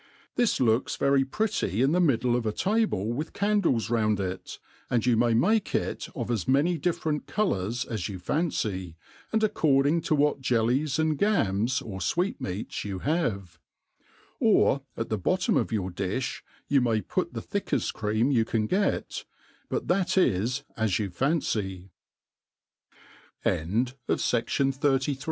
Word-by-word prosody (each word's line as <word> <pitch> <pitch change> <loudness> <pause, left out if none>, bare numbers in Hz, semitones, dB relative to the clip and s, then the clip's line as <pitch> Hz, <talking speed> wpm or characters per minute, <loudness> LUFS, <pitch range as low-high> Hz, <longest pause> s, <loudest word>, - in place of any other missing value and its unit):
This 240 -2 +2
looks 115 -1 +2
very 140 -1 +3
pretty 135 - -1
in 135 - +3
the 180 +2 +3
middle 125 -6 +2
of 120 -2 -1
a - - +1
table 190 - 0
with 150 +6 -4
candles 200 - +1
round 110 -3 +2
it, 95 -1 -4 0.3
and 120 -1 +1
you 125 -2 +4
may 115 +1 +3
tnake 215 - +2
it - - -2
of - - -3
as 110 -6 -1
many 150 +6 +2
different 160 -2 -1
colours 120 - -1
as 110 -4 -4
you 95 - -5
fancy, 95 - -2 0.4
and 220 0 +1
accoMiHg 155 -4 +2
to 155 - +2
\vhat 145 0 +2
jellies 130 +4 +1
and 155 -2 +1
gams, 130 - +1
or 100 -5 -6
fweetmeats 105 - -2
you 100 -2 -4
have; 100 - -2 0.8
or 140 - +4 0.2
at 115 - -3
the 110 - -1
bottom 185 - +1
of - - +1
your 95 -4 -1
di/b 95 +8 -2 0.4
you 140 -2 +3
may 115 -3 +2
put - - -3
the - - -2
thickeft - - -2
cream 110 +5 0
you 115 -4 +3
can 110 -1 -1
get; 195 - -1 0.5
but - - -2
that 190 +1 +1
is 120 - +2
as 110 -4 +1
you 100 -4 -2
125 Hz, 140 wpm, -27 LUFS, 105-160 Hz, 0.8 s, you